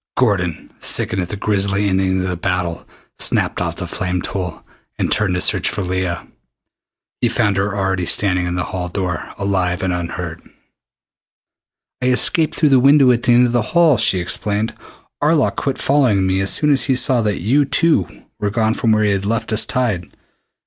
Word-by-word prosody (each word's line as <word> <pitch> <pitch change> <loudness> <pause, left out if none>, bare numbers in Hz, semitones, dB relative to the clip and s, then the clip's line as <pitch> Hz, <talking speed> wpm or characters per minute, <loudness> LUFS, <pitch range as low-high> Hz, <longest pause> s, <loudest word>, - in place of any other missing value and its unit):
Gordon, 95 -9 0
sickened 95 - 0
at 90 - -5
the - - -4
grisly 100 0 0
ending 95 -1 +1
to - - -2
the 90 - -2
battle, 90 -1 -3 0.3
snapped - - 0
off - - -2
the - - -5
flame 90 0 -3
tool 90 -2 -5 0.3
and - - -1
turned 100 -4 +1
to 90 - -1
search - - +2
for 100 - -4
Leah. 90 -1 -3 0.9
He 120 - +1
found 105 -4 +1
her 100 +1 -1
already 95 -2 -1
standing 90 -3 +1
in 90 - -3
the 90 - -1
hall 90 -1 -5
door, 90 -1 -4
alive, 95 -2 -1
and 95 -1 0
unhurt. 85 -1 -5 1.6
"I 125 - 0
escaped 150 +5 +1
through 150 - +2
the 135 -2 +5
window 135 0 +5
at 120 -1 +1
the 120 - +3
end 125 +1 +5
of 120 - 0
the 120 0 +1 0.2
hall," 165 -6 +5
she 95 - +3
explained. 105 +5 -2 0.5
"Arlok 150 -1 +2
quit 135 -2 -2
following 125 -9 +2
me 95 0 0
as 95 0 -1
soon 150 -1 +2
as 135 - +4
he 130 0 +1
saw 125 -1 +3
that 105 -3 -1
you 130 - +2
too 150 - 0 0.2
were 105 -1 -1
gone 110 +1 0
from 115 -2 +1
where 110 0 +2
he 105 - +2
had 100 -1 -1
left 110 0 -2
us 110 - +3
tied." 110 -9 -1
100 Hz, 190 wpm, -18 LUFS, 90-120 Hz, 1.6 s, the